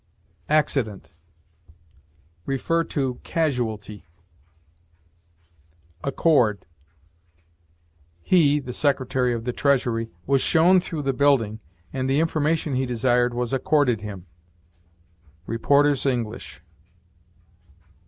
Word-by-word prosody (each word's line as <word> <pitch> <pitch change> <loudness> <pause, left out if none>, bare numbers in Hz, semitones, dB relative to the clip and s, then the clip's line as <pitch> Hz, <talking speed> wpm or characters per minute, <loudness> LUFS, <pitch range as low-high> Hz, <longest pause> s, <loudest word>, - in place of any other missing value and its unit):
ACCIDENT. 135 -9 0 1.4
See 135 -1 -1
CASUALTY. 110 - -2 2.0
ACCORD. 125 - +2 1.6
"He 150 - +3
[the 125 -3 -7
Secretary 130 -3 0
of 115 -1 -3
the 125 0 -3
Treasury] 120 -5 0 0.2
was 135 -1 +2
shown 175 +3 +4
through 165 -4 -4
the 135 -1 0
building, 125 -6 +2 0.3
and 130 0 -2
the 135 +2 +2
information 155 -1 0
he 130 0 0
desired 120 0 +1
was 125 +1 -2
accorded 135 -4 +1
him." 100 -4 -8 1.2
Reporters' 140 +6 +2
English. 120 -5 -4
130 Hz, 85 wpm, -23 LUFS, 120-145 Hz, 2.0 s, shown